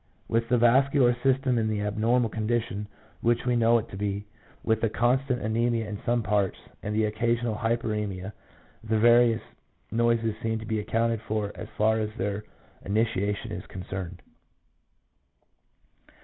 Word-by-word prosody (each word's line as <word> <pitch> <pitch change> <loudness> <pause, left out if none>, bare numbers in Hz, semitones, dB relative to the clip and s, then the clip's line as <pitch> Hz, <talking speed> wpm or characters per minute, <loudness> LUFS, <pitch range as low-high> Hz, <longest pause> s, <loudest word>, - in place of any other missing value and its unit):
With 115 0 0
the 125 - +4
vascular 125 +1 +4
system 130 -2 +2
in 110 - 0
the 105 -1 -1
abnormal 115 +3 +1
condition 110 -2 -2 0.3
which 120 +1 +1
we 125 -1 +2
know 115 0 +4
it 110 - -3
to - - -8
be, 100 +1 -3 0.4
with 110 -1 +1
the 115 - +2
constant 125 +3 +1
anemia 115 +1 0
in 105 -1 -6
some 120 -1 +2
parts, 100 -1 +1 0.2
and 105 0 -3
the 110 0 +3
occasional 115 +2 0
hypersemia, 105 -3 -2 0.5
the 110 0 0
various 120 0 +5 0.5
noises 115 -1 +2
seem 110 0 -1
to 110 - -7
be 110 -1 -1
accounted 115 +1 0
for 105 -1 -1
as - - -8
far 110 +1 +3
as 105 -1 -1
their 100 +1 -2 0.4
initiation 105 -1 -1
is - - -5
concerned. 90 -1 -7
110 Hz, 150 wpm, -27 LUFS, 105-120 Hz, 0.5 s, various